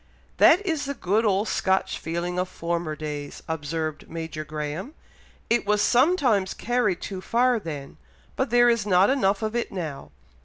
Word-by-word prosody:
"That 385 +5 +6
is 320 -6 -1
the 280 0 -3
good 215 +1 +1
old 205 +1 +2
Scotch 190 0 0
feeling 170 +2 -3
of 180 0 -1
former 170 -2 -3
days," 150 -2 -6
observed 155 0 -4
Major 160 -2 -5
Graham. 155 - -5 0.5
"It 235 -3 +1
was 210 0 +3
sometimes 245 - +3
carried 230 -6 0
too 190 -2 -5
far 240 +3 +2
then, 150 -7 -7 0.4
but 265 - -1
there 240 +1 +5
is 230 -3 +2
not 190 +3 +5
enough 205 -6 +1
of 215 +1 -2
it 240 - -1
now. 160 -7 -5
190 Hz, 160 wpm, -25 LUFS, 160-235 Hz, 0.5 s, That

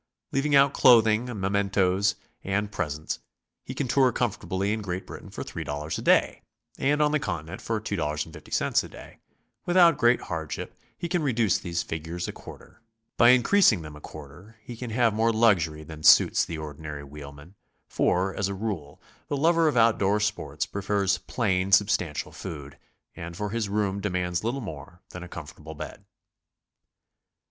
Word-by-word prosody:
Leaving 145 +2 +1
out 140 0 +5
clothing, 115 -1 +5
mcment'ces 100 -2 +1 0.3
and 100 +2 -1
presents, 80 -5 -3 0.4
he - - -7
can 140 - -2
tour 130 +1 +3
comfortably 100 -4 -1
in 110 - -3
Great 95 -2 -4
Britain - - -10
for - - -6
$3 75 +2 -5
a - - -4
day - - +3 0.4
and 145 +2 +2
on 150 - +2
the 150 - +2
Continent 85 - -5
for 115 -1 -2
$2.50 80 -6 -2
a - - -8
day; - - -13 0.5
without 175 -4 +5
great 120 0 +4
hardship 80 -3 -5 0.2
he 170 - -4
can 175 0 0
reduce 120 -8 +1
these 85 -2 -3
figures 80 +2 -5
a - - -3
quarter; - - -13 0.3
by 120 - +6
increasing 125 - +4
them 75 -1 -9
a 75 - -12
quarter, 80 +11 -12
he 120 - -8
can 120 +1 -6
have 115 0 +2
more 115 +2 +2
luxury 90 -9 +2
than 75 0 -10
suits 75 - +6
the 85 - -6
ordinary 75 -1 -7
wheelman, 75 +3 -11 0.3
for, 95 +2 +1
as 100 - -1
a 100 - -4
rule, 95 -9 -5 0.3
the 145 - -2
lover 165 +2 +3
of 150 - +1
out 115 -1 +4
door 100 +2 +2
sport 105 -8 -2
prefers 100 -1 0
plain, 95 -5 -1
substantial 95 -6 +2
food, 70 -3 -8 0.4
and 85 0 -8
for 105 -1 -3
his 115 -3 -2
room 100 -1 -1
demands 90 -2 -2
little 120 +5 -2
more 85 - -9
than 90 - -9
a 90 - -8
comfortable 80 -1 -10
bed. - - -9
100 Hz, 165 wpm, -26 LUFS, 80-115 Hz, 0.5 s, by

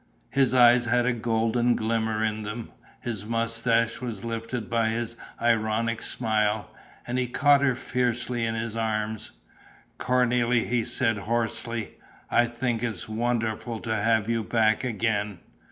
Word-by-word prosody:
His 135 -2 +3
eyes 120 0 +6
had 120 +1 +2
a 125 - +2
golden 115 +1 +1
glimmer 110 -1 0
in 110 0 -1
them; 110 +2 -6 0.3
his 110 -5 -3
moustache 115 +1 0
was 115 -4 -5
lifted 115 0 -4
by 115 -1 +1
his 115 +1 -2 0.2
ironic 115 0 +1
smile. 110 -2 0 0.3
And 125 +1 -1
he 125 - 0
caught 140 +3 +4
her 135 -3 +2
fiercely 120 -1 -1
in 115 0 -1
his 115 0 -3
arms: 110 -1 -2 0.7
"Cornélie," 125 -1 +2
he 120 -1 +1
said, 115 -3 +1
hoarsely, 115 +1 -2 0.3
"I 120 - +4
think 120 -1 -2
it's 110 -8 -3
wonderful 115 0 -1
to 110 - -2
have 110 0 +2
you 115 -1 0
back 110 0 +2
again. 105 -4 -1
115 Hz, 140 wpm, -26 LUFS, 110-120 Hz, 0.7 s, eyes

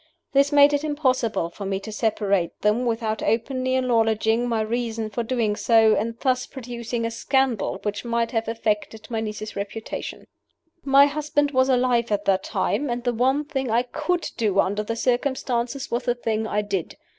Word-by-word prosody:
This 280 +1 +4
made 290 0 +6
it 290 +1 0
impossible 255 - 0
for 200 - -8
me 195 0 -2
to 220 - -7
separate 205 -5 0
them 220 +4 +2
without 225 -2 -1
openly 255 +3 0
acknowledging 225 -1 +2
my 225 -2 +1
reason 225 -1 -2
for 225 - -2
doing 225 -3 0
so, 225 -1 +4
and 230 +2 -2
thus 255 -2 +1
producing 240 -2 -5
a 230 - -2
scandal 255 -4 0
which 205 -1 -3
might 235 -1 -1
have 225 -1 -1
affected 220 -1 -2
my 225 - -1
niece's 215 0 -5
reputation. 205 +2 -6 0.6
My 275 +1 +6
husband 290 0 0
was 260 0 +3
alive 245 -3 +2
at 205 0 0
that 190 -1 +3
time; 290 0 -1
and 240 0 -2
the 245 - 0
one 265 +5 +1
thing 270 -4 -3
I 235 +2 +2
could 345 +8 -2
do 205 -4 +1
under 200 +2 +1
the 225 +2 -3
circumstances 250 +1 -1
was 235 - -1
the 245 - +1
thing 220 -2 -2
I 210 0 0
did. 195 -5 -3
235 Hz, 180 wpm, -24 LUFS, 220-255 Hz, 0.6 s, made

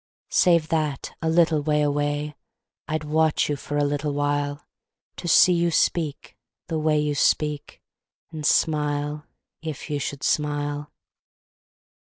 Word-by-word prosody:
Save 170 -3 +3
that, 155 -4 -2
a 160 - 0
little 165 -2 +3
way 150 0 +1
away, 145 +1 -1 0.5
I'd 155 0 -2
watch 155 +1 +1
you 145 - 0
for 145 +1 -5
a 145 - +2
little 145 0 -1
while, 145 0 -1 0.5
To - - -6
see 180 +2 +6
you 170 0 +2
speak, 155 -2 -1 0.3
the 160 -2 -2
way 155 0 +2
you 150 0 0
speak, 150 0 0 0.5
And 155 -2 -7
smile, 150 -1 0 0.3
if 155 -1 -6
you 145 - -1
should 140 0 -5
smile. 145 0 -1
150 Hz, 135 wpm, -24 LUFS, 145-155 Hz, 0.5 s, see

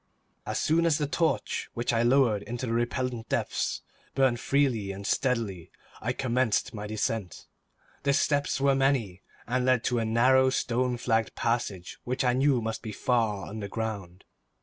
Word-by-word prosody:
As - - -2
soon 170 +2 +2
as 155 -3 +3
the 150 - 0
torch, 145 -5 -1
which 120 +1 -1
I 115 - +2
lowered 120 -4 +3
into 120 +4 -5
the 115 - -2
repellent 120 0 -2
depths, - - -1 0.3
burned 130 -3 +3
freely 125 -8 +1
and 100 +1 -8
steadily, 110 -11 -1 0.3
I 120 - -1
commenced 125 -3 0
my 105 -1 -5
descent. 110 -3 -3 0.6
The 140 0 +2
steps 145 0 +1
were 140 0 +3
many, 135 -9 +1 0.2
and 125 +1 0
led 130 -2 +3
to 120 -2 +1
a - - 0
narrow 130 +4 +4
stone 125 -1 0
flagged 115 -2 0
passage 115 -6 -2
which 125 +2 -1
I 125 -1 +3
knew 130 -2 +2
must 110 0 -3
be 110 - -6
far 110 -3 0
underground. 100 -3 -5
120 Hz, 160 wpm, -28 LUFS, 110-130 Hz, 0.6 s, narrow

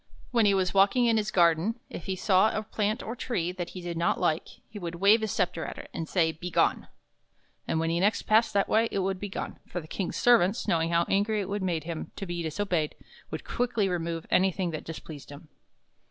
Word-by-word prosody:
When 230 -3 +4
he 200 - +4
was 185 -1 +1
walking 200 +6 +4
in 230 -1 +3
his 210 -1 0
garden, 175 +6 +3
if 160 - -8
he 190 - -2
saw 190 +2 +4
a 215 - -2
plant 215 +1 -1
or 225 - -4
a - - -9
tree 190 -9 -2
that 180 -2 -5
he - - -5
did 175 -1 -5
not 170 +1 +1
like, 155 +1 0 0.2
he 210 - -9
would 170 -2 -5
wave 200 +5 +5
his 220 - -1
scepter 175 -3 -1
at - - -6
it, - - -10
and 160 - -4
say 165 -3 +2
"Be 165 +3 -7
gone!" - - +1 0.8
And 160 - 0
when 165 0 0
he 170 - +1
next 205 +4 +2
passed 220 +1 +3
that 200 - +3
way, 225 +1 +2
it - - -2
would 190 -1 -1
be 205 - -5
gone, - - -5
for 180 - -4
the 155 - -10
King's 185 +2 -3
servants, 225 -3 +3
knowing 165 -4 +2
how 170 0 +3
angry 205 +2 +1
it 200 +1 -3
made 170 -5 -1
him 165 0 -5
to 195 - -5
be 175 -1 -4
disobeyed, 165 -1 -1 0.3
would - - -5
quickly 235 -4 0
remove 170 -2 -2
anything 185 -1 +2
that 155 - -6
dis 165 - -6
pleased 150 -4 -10
him. 145 +2 -12
185 Hz, 235 wpm, -28 LUFS, 170-210 Hz, 0.8 s, wave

